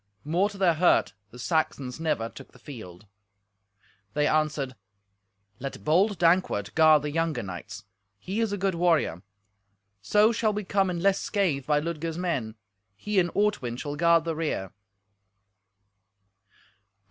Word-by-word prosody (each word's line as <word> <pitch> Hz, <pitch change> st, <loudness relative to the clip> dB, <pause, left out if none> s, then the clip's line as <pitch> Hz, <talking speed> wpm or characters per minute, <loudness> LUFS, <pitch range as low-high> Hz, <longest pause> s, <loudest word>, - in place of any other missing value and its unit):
More 175 Hz, +7 st, +1 dB
to 200 Hz, -, -11 dB
their 185 Hz, -3 st, +3 dB
hurt 175 Hz, +3 st, +3 dB, 0.2 s
the 125 Hz, -, -13 dB
Saxons 140 Hz, -2 st, -1 dB
never 150 Hz, -8 st, -1 dB
took -, -, -13 dB
the -, -, -16 dB
field. 110 Hz, -, -11 dB, 1.1 s
They 150 Hz, -, +2 dB
answered, 150 Hz, -4 st, 0 dB, 0.8 s
"Let 135 Hz, +1 st, -6 dB
bold 190 Hz, +6 st, +2 dB
Dankwart 165 Hz, -, +2 dB
guard 155 Hz, -2 st, +5 dB
the 150 Hz, -, -3 dB
younger 165 Hz, -5 st, -1 dB
knights. 95 Hz, +2 st, -8 dB, 0.3 s
He 190 Hz, -, -4 dB
is 225 Hz, -2 st, 0 dB
a 205 Hz, -, -2 dB
good 195 Hz, 0 st, 0 dB
warrior. 165 Hz, -, +1 dB, 0.8 s
So 210 Hz, -, +4 dB
shall 215 Hz, -1 st, 0 dB
we 210 Hz, +1 st, -3 dB
come 195 Hz, 0 st, +1 dB
in 175 Hz, -2 st, -3 dB
less 195 Hz, +1 st, +3 dB
scathe 165 Hz, -10 st, -1 dB
by 150 Hz, -1 st, +3 dB
Ludger's 165 Hz, 0 st, -4 dB
men. 135 Hz, -12 st, -2 dB, 0.4 s
He 200 Hz, -, 0 dB
and 175 Hz, -1 st, +2 dB
Ortwin 200 Hz, -, 0 dB
shall 145 Hz, +2 st, -5 dB
guard 170 Hz, +1 st, +4 dB
the 165 Hz, -1 st, -3 dB
rear." 150 Hz, -, -3 dB
160 Hz, 145 wpm, -27 LUFS, 135-185 Hz, 1.1 s, guard